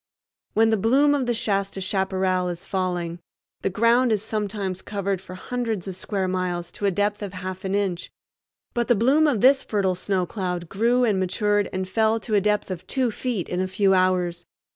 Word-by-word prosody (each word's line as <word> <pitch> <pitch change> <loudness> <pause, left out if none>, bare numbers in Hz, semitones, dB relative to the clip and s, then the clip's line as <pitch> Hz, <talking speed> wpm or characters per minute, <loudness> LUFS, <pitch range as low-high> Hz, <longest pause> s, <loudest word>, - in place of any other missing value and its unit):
When 225 +1 +4
the 220 - +3
bloom 275 +6 +4
of 270 -4 0
the 240 - +2
Shasta 195 -3 -1
chaparral 185 -1 0
is 175 +2 -6
falling, 180 -3 -2 0.4
the - - 0
ground 235 +5 +3
is 210 -2 +1
sometimes 205 -4 -3
covered 200 -2 -2
for 185 - -10
hundreds 225 -2 -3
of 190 - -4
square 190 0 -2
miles 180 -2 -2
to 205 - -2
a - - +5
depth 205 +3 0
of 200 -2 -5
half 185 0 -6
an 190 +1 0
inch. 195 -4 -2 0.6
But 240 -1 0
the 240 - +4
bloom 270 +9 +4
of 245 -9 +1
this 270 +1 +6
fertile 195 -3 0
snow 185 0 -1
cloud 180 -2 -3
grew 235 +5 +2
and 210 -5 +2
matured 205 +2 +1
and 185 0 -3
fell 220 +3 +2
to 220 - -5
a 205 - +4
depth 210 -1 0
of 180 -2 -6
two 255 -3 0
feet 225 -5 -3
in 180 +1 -2
a 185 - 0
few 195 +1 +2
hours. 180 -2 +1
195 Hz, 200 wpm, -24 LUFS, 185-220 Hz, 0.6 s, this